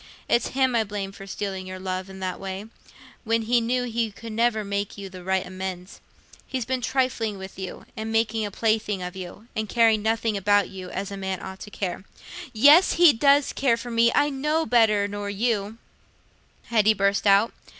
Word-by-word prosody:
It's 235 - +2
him 260 -2 +3
I 225 - +3
blame 200 -2 -5
for 195 0 -11
stealing 190 -1 -4
your 185 0 -6
love 185 0 -4
i' - - -10
that 185 -1 -4
way, 195 +1 -5 0.6
when 230 -1 +1
he 240 +2 +2
knew 245 +2 0
he 235 -2 -1
could 225 +2 -10
never 225 -1 +1
make 200 0 -3
you 200 -1 -7
the 185 -1 -10
right 190 +1 0
amends. 185 0 -7 0.5
He's 255 -3 -3
been 260 +1 -2
trifling 235 -4 -1
with 190 0 -9
you, 190 -1 -7
and 220 +1 -4
making 225 0 +1
a 205 - -2
plaything 215 -2 0
of 180 0 -6
you, 190 +3 -9
and 215 -2 -2
caring 225 -2 +4
nothing 220 0 0
about 205 0 +2
you 185 -1 -8
as 195 +1 -5
a 200 - -5
man 190 -1 -3
ought 190 0 -8
to - - -9
care." 190 -3 -4 0.5
"Yes, 290 - +6
he 340 -4 +6
does 280 +4 +3
care 260 -4 +2
for 240 +1 -7
me; 230 0 +4
I 290 0 +3
know 300 +4 0
better 220 -3 +3
nor 205 0 -5
you," 210 0 -1 0.9
Hetty 220 -2 +3
burst 200 +1 +1
out. 200 +3 +4
215 Hz, 195 wpm, -25 LUFS, 195-230 Hz, 0.9 s, Yes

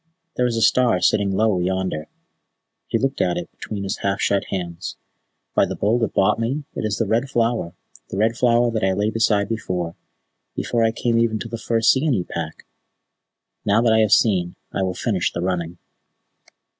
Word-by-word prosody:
There 125 - +2
is 115 -2 -1
a 115 - +2
star 120 -4 +4
sitting 100 +2 +2
low 110 -3 +2
yonder." 90 -4 -2 0.8
He - - +1
looked 135 +3 -1
at 90 -1 +1
it 90 - -6
between 100 -2 -6
his 95 0 -2
half 100 +1 -1
shut 100 -1 +1
hands. 90 -2 -5 0.6
"By - - +3
the - - -4
Bull 110 +4 +1
that 115 -4 -2
bought 105 +3 +3
me, 130 +6 -1
it - - -3
is 105 -2 -1
the 115 - +1
Red 115 +6 0
Flower 115 -8 0 0.3
the - - -5
Red 110 +3 +2
Flower 120 0 +3
that 110 -1 -2
I 95 0 +3
lay 105 +3 0
beside 105 -3 +2
before 90 -6 -3 0.6
before 115 -1 0
I 115 - +3
came 115 0 0
even 115 -1 +1
to - - -6
the 115 - -6
first 115 0 +3
Seeonee 130 - +1
Pack! 80 -2 -6 1.0
Now 105 +1 +3
that 115 -2 +4
I 110 - +4
have 110 -3 +3
seen, 95 -8 +3 0.2
I - - -1
will 95 -1 -1
finish - - 0
the 85 - -4
running." 85 -2 -2
105 Hz, 195 wpm, -22 LUFS, 95-115 Hz, 1.0 s, star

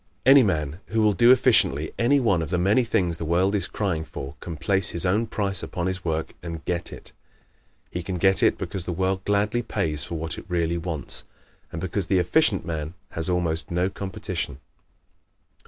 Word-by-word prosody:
Any 135 +2 +8
man 80 - -1
who 110 0 +1
will 105 -1 +4
do 120 +6 +6
efficiently 110 - +3
any 140 +5 +4
one 100 -9 +2
of 80 - -4
the 90 - 0
many 100 +8 +3
things 95 -8 0
the 80 - -5
world 90 +5 +2
is 100 -3 +1
crying 90 -7 -2
for 70 -3 -7
can 85 -2 -7
place 95 +4 +2
his 85 +2 0
own 105 +5 +1
price 100 -3 -1
upon 90 -2 -4
his 95 0 -2
work 80 -1 -2
and 85 -2 -7
get 85 -1 -2
it. - - -10 0.8
He 90 - -3
can 90 +2 -4
get 95 +2 +4
it - - +3
because 95 -3 -3
the 90 - -1
world 95 +2 -1
gladly 105 +3 +1
pays 80 - -2
for 85 - -5
what 80 +1 -3
it - - -12
really 85 -1 0
wants, 80 -4 -4 0.5
and - - -5
because 95 +2 -2
the 95 - +2
efficient 100 - +2
man 80 -1 -4 0.2
has 80 +2 -3
almost 85 -2 -1
no 90 +2 0
competition. 95 -8 -5
90 Hz, 195 wpm, -25 LUFS, 85-100 Hz, 0.8 s, Any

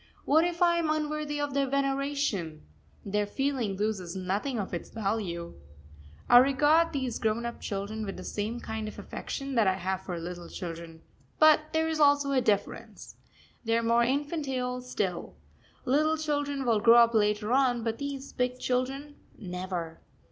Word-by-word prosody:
What 315 +3 +4
if 350 0 0
I 345 -1 +4
am 330 -2 0
unworthy 305 -1 -2
of 290 -1 -2
their 275 0 +1
veneration 275 - -1 0.4
their 205 +1 0
feeling 260 -4 -1
loses 195 -4 -2
nothing 195 +8 -2
of 200 -4 -4
its 170 - -5
value. 195 -6 -3 0.7
I 245 - +9
regard 295 +5 +4
these 260 -5 -3
grown 220 +2 0
up 235 - -6
children 205 +2 -4
with 195 -2 -5
the - - -8
same 215 +3 -3
kind 220 -1 -4
of 215 - -8
affection 275 -1 -6
that 225 -5 +3
I 190 - +3
have 190 0 -2
for 180 -2 -5
little 175 0 -7
children 165 -2 -8 0.3
but 310 0 +5
there 320 0 +1
is 320 -1 -2
also 285 -1 +4
a 265 -2 +3
difference. 205 -4 -2 0.5
They 225 0 +1
are 230 - 0
more 235 +1 +3
infantile 265 -2 -1
still. 200 -8 -3 0.5
Little 305 +5 +2
children 290 -3 -2
will 230 -3 +3
grow 230 +2 +6
up 235 0 +1
later 210 0 +1
on, 255 -3 +2
but 225 0 -2
these 280 -1 -5
big 250 0 -1
children 270 +4 -2 0.2
never. 180 -4 -5
245 Hz, 165 wpm, -28 LUFS, 205-285 Hz, 0.7 s, I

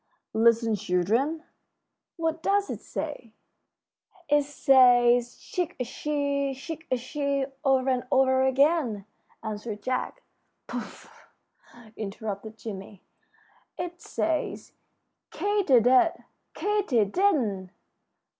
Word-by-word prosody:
"Listen, 230 0 +3
children, 220 - 0 0.7
what 325 -1 -2
does 400 +2 +1
it - - -6
say?" 270 -7 -6 1.0
"It 295 0 +5
says, 245 -3 +4
'Chic 360 -3 -4
a - - 0
chee, 280 +1 -1
chic 315 +4 -8
a 255 - +1
chee,' 280 +2 -2 0.2
over 270 -1 +2
and 255 -1 0
over 260 0 +3
again," 265 - +2 0.4
answered 210 -1 -5
Jack. 255 0 -3 0.4
"Pooh," - - -7 0.9
interrupted 215 +1 -6
Jimmie, 200 -3 -8 0.7
"it 350 0 -6
says, 320 -1 -2 0.6
'Katy 400 - +3
did, 255 +8 +5 0.4
Katy 400 - +1
didn't!'" 215 - +1
260 Hz, 95 wpm, -27 LUFS, 225-305 Hz, 1.0 s, It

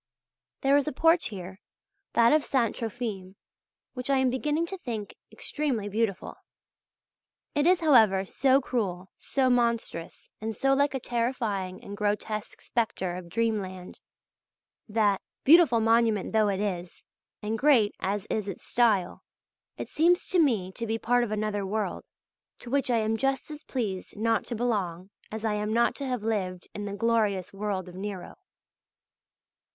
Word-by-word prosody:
There 275 +1 +4
is 285 - 0
a - - 0
porch 325 +4 +3
here 190 -2 -8 0.5
that 235 +2 +5
of 305 -1 +4
St. 240 -5 +1
Trophime 215 -5 -5 0.6
which 250 0 -5
I 275 - +4
am 260 -1 +2
beginning 300 +5 0
to 385 +3 -5
think 220 -8 -5 0.2
extremely 265 -9 -2
beautiful. 210 -2 -2 1.2
It 290 +2 +2
is, 360 -1 +4
however, 220 -11 +5
so 270 +6 +3
cruel, 190 -8 -3
so 265 -2 0
monstrous, 235 -8 -1
and 220 0 -3
so 270 +5 +2
like 280 0 +2
a - - -1
terrifying 230 -7 -2
and 200 - -7
grotesque 210 +1 -2
spectre 190 -6 -2
of 180 -1 -8
dreamland, 195 -4 -2 0.9
that, 210 -2 +2 0.2
beautiful 300 -6 +6
monument 225 -2 +2
though 215 -1 +4
it 195 -1 0
is, 185 -4 -4 0.4
and 220 +1 -2
great 260 -8 +4
as 200 +1 -2
is 215 -2 -1
its 195 - -7
style, 215 -7 +2 0.6
it - - -5
seems 345 +3 +3
to 370 - +2
me 220 - +2
to 230 +4 -5
be 225 +1 0
part 245 +2 +2
of 235 - -2
another 210 -1 -1
world, 210 +2 -2 0.5
to 240 - -10
which 275 -1 +1
I 240 - +3
am 220 0 0
just 270 +4 -1
as 300 0 -8
pleased 205 -7 -4
not 225 +1 +1
to 240 - -4
belong 200 -6 -2 0.2
as 220 +1 -5
I 215 - +1
am 210 +1 -2
not 235 +1 +3
to 280 - -4
have 250 -4 -2
lived 185 -5 -2
in 205 - -5
the 200 - -4
glorious 210 -5 +1
world 195 -2 -3
of 180 - -10
Nero. 190 -1 -6
225 Hz, 160 wpm, -27 LUFS, 200-255 Hz, 1.2 s, beautiful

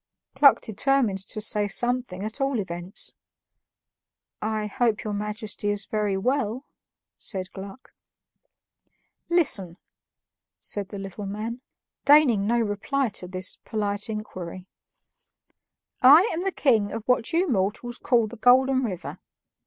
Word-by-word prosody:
Gluck 275 +1 +6
determined 230 -2 +1
to - - -3
say 210 -1 +1
something 240 -3 -1
at 220 +6 -6
all 270 -3 +1
events. 175 0 -4 1.3
"I 215 0 -1
hope 215 +1 0
your 210 - -3
Majesty 210 0 -4
is 205 0 -2
very 210 -2 -1
well," 255 +3 -1 0.5
said 190 -3 -3
Gluck. 195 +6 -10 1.4
"Listen!" 205 - +2 0.8
said 200 -2 -4
the 205 - -7
little 195 +1 -6
man, 220 +5 -5 0.4
deigning 270 -9 +5
no 235 +1 +2
reply 230 +5 -1
to 190 -3 -7
this 185 0 -3
polite 210 -1 -3
inquiry. 185 -4 -6 1.4
"I 280 +5 +9
am 345 +3 -3
the 390 - +1
king 225 - +2
of 225 -1 -6
what 250 -2 +2
you 350 +3 +2
mortals 235 - -1
call 235 -3 +2
the 225 +2 -9
Golden 260 +3 +4
River. 190 -7 -5
215 Hz, 125 wpm, -25 LUFS, 200-250 Hz, 1.4 s, I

